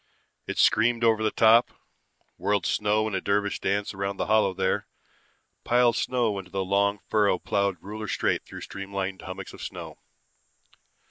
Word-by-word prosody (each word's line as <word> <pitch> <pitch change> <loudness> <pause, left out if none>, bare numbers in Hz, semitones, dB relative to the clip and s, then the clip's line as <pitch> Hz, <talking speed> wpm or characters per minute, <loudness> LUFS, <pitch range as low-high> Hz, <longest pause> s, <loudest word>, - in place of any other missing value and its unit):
It - - -4
screamed 115 +1 +3
over 110 -1 +3
the 110 - +2
top, 115 +2 +5 0.7
whirled 100 -3 0
snow 105 +1 +1
in 110 - -4
a 95 - -1
dervish 100 0 0
dance 100 +2 -1
around 100 0 -3
the - - -1
hollow 110 -2 +3
there, 95 0 -1 0.8
piled 120 -1 +3
snow 115 -6 0
into 95 -2 -10
the 95 0 -2
long 100 +1 +2
furrow 105 -4 +2
plowed 100 +1 -1
ruler 105 +2 -6
straight - - 0
through - - -10
streamlined 95 -1 -5
hummocks 95 0 -8
of - - -11
snow. - - -8
100 Hz, 155 wpm, -26 LUFS, 95-110 Hz, 0.8 s, top